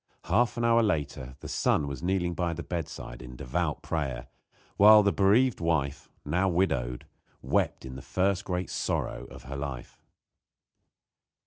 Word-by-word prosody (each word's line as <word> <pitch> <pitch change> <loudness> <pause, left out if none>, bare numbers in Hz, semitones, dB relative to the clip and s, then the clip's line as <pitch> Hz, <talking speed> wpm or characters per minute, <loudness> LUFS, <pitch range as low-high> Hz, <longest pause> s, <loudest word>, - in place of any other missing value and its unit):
Half 120 0 +1
an 120 - 0
hour 115 0 +5
later 70 - -2
the - - -7
son 75 - +1
was 70 -2 -5
kneeling 90 -1 0
by 85 0 -1
the 85 +1 -6
bedside 80 -8 -6
in 60 0 -10
devout 75 +6 -2
prayer, 70 -7 -3 0.5
while 105 +1 +8
the 100 - +3
bereaved 110 +6 +3
wife, 70 -4 -1 0.2
now 90 +6 +1
widowed, 70 -9 0 0.4
wept - - 0
in 65 0 -7
the - - -8
first 95 +4 0
great 90 -1 -3
sorrow - - -2
of - - -12
her 70 +2 -7
life. 70 -3 -6
85 Hz, 150 wpm, -28 LUFS, 70-95 Hz, 0.5 s, while